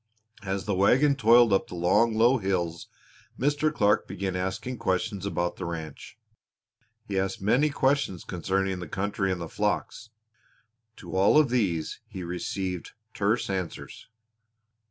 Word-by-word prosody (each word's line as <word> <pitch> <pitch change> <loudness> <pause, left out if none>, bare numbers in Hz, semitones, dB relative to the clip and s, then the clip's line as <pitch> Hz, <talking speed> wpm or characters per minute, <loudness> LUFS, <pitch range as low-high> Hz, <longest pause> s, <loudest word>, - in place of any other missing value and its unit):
As 95 -1 -3
the 105 - -1
wagon 130 +10 +4
toiled 120 -2 +5
up 95 - +2
the - - -8
long, 105 +7 +2
low 120 +4 +4
hills 90 -4 -2 0.5
Mr. 145 +3 +1
Clark 105 -8 +2
began 95 0 -3
asking 100 +7 -3
questions 100 +1 -1
about 85 -3 -2
the 95 - -5
ranch 80 -3 -7 0.9
he 100 -3 -1
asked 95 0 -2
many 125 +10 +2
questions 140 - 0
concerning 95 +1 -2
the 90 - -6
country 95 +2 -1
and 90 - -2
the 85 - -5
flocks. 110 +6 -2 0.9
To 85 -1 -9
all 95 +9 +5
of 155 -4 +5
these 90 -11 0
he 95 - -7
received 90 +1 -4 0.2
terse 105 +4 0
answers. 95 -3 -5
95 Hz, 140 wpm, -27 LUFS, 90-115 Hz, 0.9 s, toiled